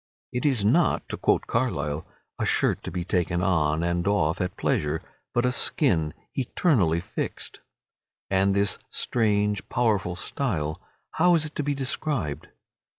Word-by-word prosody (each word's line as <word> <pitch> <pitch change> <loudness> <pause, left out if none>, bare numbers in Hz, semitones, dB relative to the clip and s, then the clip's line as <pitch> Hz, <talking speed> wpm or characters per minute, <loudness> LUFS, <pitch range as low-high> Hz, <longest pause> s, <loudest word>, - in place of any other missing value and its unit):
It 125 +4 0
is 125 -8 +1
not, 155 +11 +3
to - - -4
quote - - +2
Carlyle, 75 - -1 0.3
a - - 0
shirt - - +2
to - - -4
be 90 0 -3
taken 90 -1 0
on 80 -4 +2
and 85 +1 0
off 90 -3 +1
at 90 - -3
pleasure, 75 +2 0 0.3
but 120 +1 +1
a 125 - +3
skin, 85 - +2 0.2
eternally 120 - +2
fixed. - - -5 0.7
And 95 +1 +2
this 100 -1 +1
strange, 105 -3 +1
powerful 105 -7 +1
style, 90 - -2 0.3
how 175 +1 +4
is 160 -2 +2
it 155 - -7
to - - -2
be 145 0 -1
described? 130 - -2
100 Hz, 150 wpm, -26 LUFS, 85-125 Hz, 0.7 s, how